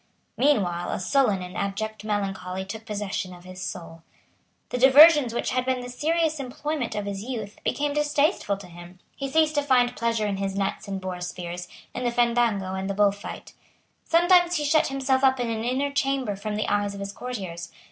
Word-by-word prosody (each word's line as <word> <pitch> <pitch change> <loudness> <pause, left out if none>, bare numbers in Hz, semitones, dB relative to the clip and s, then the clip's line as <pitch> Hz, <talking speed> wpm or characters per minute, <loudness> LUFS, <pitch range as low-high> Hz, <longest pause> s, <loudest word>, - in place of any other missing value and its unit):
Meanwhile 195 -11 +1
a - - -2
sullen 210 -3 +2
and 180 +2 -9
abject 215 +2 -3
melancholy 195 -3 -3
took 220 +3 -8
possession 200 -3 -3
of 175 - -15
his 185 0 -10
soul. 165 -2 -6 0.7
The 250 - -2
diversions 285 0 +8
which 235 - -2
had 255 0 +1
been 255 0 -1
the 245 - -7
serious 315 +3 0
employment 275 0 -3
of 205 -1 -2
his 200 -1 -4
youth 220 -3 -6
became 290 0 0
distasteful 295 - +1
to 200 - -11
him. 175 +1 -12 0.2
He 275 -1 -4
ceased 310 +2 +3
to 290 - +2
find 255 -3 +3
pleasure 230 -2 0
in 200 -2 -1
his 195 0 -2
nets 195 +1 -2
and 195 -1 -3
boar 185 -1 -5
spears, 180 0 -5 0.3
in 250 - -4
the 240 - +2
fandango 235 -5 +1
and 190 +1 -3
the 195 - -2
bullfight. 205 0 -1 0.5
Sometimes 350 +1 +4
he 300 -3 0
shut 310 +2 +3
himself 270 -1 0
up 265 -1 +4
in 240 -1 -1
an 220 0 -3
inner 265 +4 0
chamber 270 -6 0
from 210 +2 -4
the 215 - -1
eyes 205 0 0
of - - -8
his 200 0 -5
courtiers. 185 -10 -6
220 Hz, 195 wpm, -25 LUFS, 195-270 Hz, 0.7 s, diversions